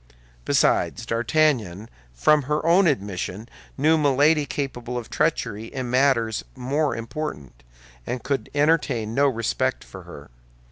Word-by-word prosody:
Besides, 115 Hz, -, +1 dB
D'Artagnan 115 Hz, -, 0 dB, 0.2 s
from 150 Hz, -, +3 dB
her 150 Hz, +3 st, -2 dB
own 175 Hz, +3 st, +5 dB
admission 100 Hz, -, -3 dB, 0.3 s
knew 155 Hz, +3 st, +3 dB
Milady 145 Hz, +1 st, +3 dB
culpable 125 Hz, -4 st, -4 dB
of 120 Hz, -2 st, -7 dB
treachery 105 Hz, +2 st, -1 dB
in 125 Hz, 0 st, -5 dB
matters 125 Hz, -4 st, +2 dB
more 140 Hz, +4 st, -1 dB
important, 115 Hz, -, -6 dB, 0.5 s
and 125 Hz, -2 st, -4 dB
could 135 Hz, -6 st, -2 dB
entertain 145 Hz, -7 st, +1 dB
no 140 Hz, +3 st, +3 dB
respect 115 Hz, -4 st, -1 dB
for -, -, -11 dB
her. -, -, -12 dB
130 Hz, 125 wpm, -23 LUFS, 115-150 Hz, 0.5 s, own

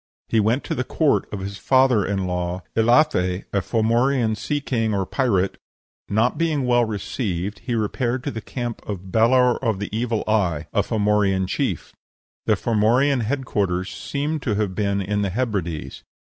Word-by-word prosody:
He 115 Hz, -, +3 dB
went 115 Hz, +6 st, +2 dB
to -, -, -3 dB
the 130 Hz, -4 st, -1 dB
court 150 Hz, +2 st, +1 dB
of 105 Hz, -, -4 dB
his 100 Hz, +1 st, -6 dB
father 130 Hz, -4 st, +4 dB
in 95 Hz, 0 st, -1 dB
law, 90 Hz, 0 st, -2 dB
Elathe, 110 Hz, -6 st, +3 dB
a 100 Hz, -, +2 dB
Formorian 115 Hz, +2 st, +1 dB
sea 145 Hz, +6 st, -2 dB
king 115 Hz, -6 st, -1 dB
or 95 Hz, -1 st, 0 dB
pirate; 100 Hz, -6 st, 0 dB, 0.5 s
not 110 Hz, +8 st, +1 dB
being 155 Hz, -5 st, +1 dB
well 120 Hz, -1 st, +3 dB
received, 100 Hz, -2 st, -3 dB
he 120 Hz, -1 st, -3 dB
repaired 120 Hz, +3 st, -1 dB
to -, -, -2 dB
the 110 Hz, -, -5 dB
camp 120 Hz, +1 st, -5 dB
of 95 Hz, -2 st, -5 dB
Balor 125 Hz, +3 st, +3 dB
of 110 Hz, -5 st, +1 dB
the 100 Hz, +2 st, -5 dB
Evil 115 Hz, -1 st, -1 dB
Eye, 95 Hz, -9 st, +1 dB
a -, -, +3 dB
Formorian 105 Hz, -3 st, +1 dB
chief. 95 Hz, -, -2 dB, 0.5 s
The -, -, +4 dB
Formorian 120 Hz, +5 st, +2 dB
head 135 Hz, +4 st, -2 dB
quarters 95 Hz, -5 st, -1 dB
seem 150 Hz, +2 st, -3 dB
to 115 Hz, -6 st, -1 dB
have 100 Hz, -2 st, -1 dB
been 100 Hz, 0 st, 0 dB
in 105 Hz, +2 st, -1 dB
the 100 Hz, -, 0 dB
Hebrides. 95 Hz, -8 st, -3 dB
110 Hz, 170 wpm, -22 LUFS, 100-125 Hz, 0.5 s, father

